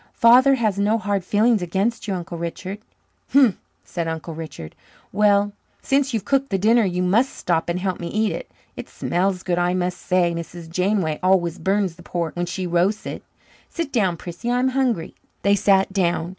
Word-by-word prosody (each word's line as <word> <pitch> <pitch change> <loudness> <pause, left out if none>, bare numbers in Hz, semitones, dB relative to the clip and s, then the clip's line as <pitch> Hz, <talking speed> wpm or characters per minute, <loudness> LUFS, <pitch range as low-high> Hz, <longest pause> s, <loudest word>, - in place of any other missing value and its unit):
Father 255 +4 +6
has 215 -5 0
no 210 +3 +2
hard 205 -3 -1
feelings 215 +3 +2
against 200 +7 -1
you, 195 - -1
Uncle 170 -1 -6
Richard." 185 +4 -5 0.5
"Humph!" 265 -8 +5 0.3
said 170 -2 -4
Uncle 160 0 -5
Richard. 155 - -8 0.4
"Well, 205 -1 +3 0.3
since 275 0 +1
you've 225 -5 -2
cooked 275 0 +1
the 195 - 0
dinner 225 +4 +4
you 180 -2 -1
must 220 +9 +2
stop 170 -1 -1
and 170 +1 -1
help 185 -1 -2
me 170 - -4
eat 215 +3 0
it. - - -6 0.3
It - - -8
smells 185 +1 -1
good, 175 -1 0
I 175 +1 +1
must 180 0 -2
say. 180 -2 +1
Mrs. 170 0 -7
Janeway 180 -3 0
always 185 -2 +2
burns 190 -3 -1
pork 170 -3 -3
when 175 0 -2
she 185 +1 -3
roasts 180 +5 +1
it. - - -5 0.5
Sit 335 -4 -4
down, 190 -8 +1
Prissy. 175 +8 -6
I'm 250 +2 +2
hungry." 255 -10 -1 0.3
They 200 - +4
sat 195 -1 +3
down. 175 -3 0
190 Hz, 185 wpm, -22 LUFS, 175-215 Hz, 0.5 s, Father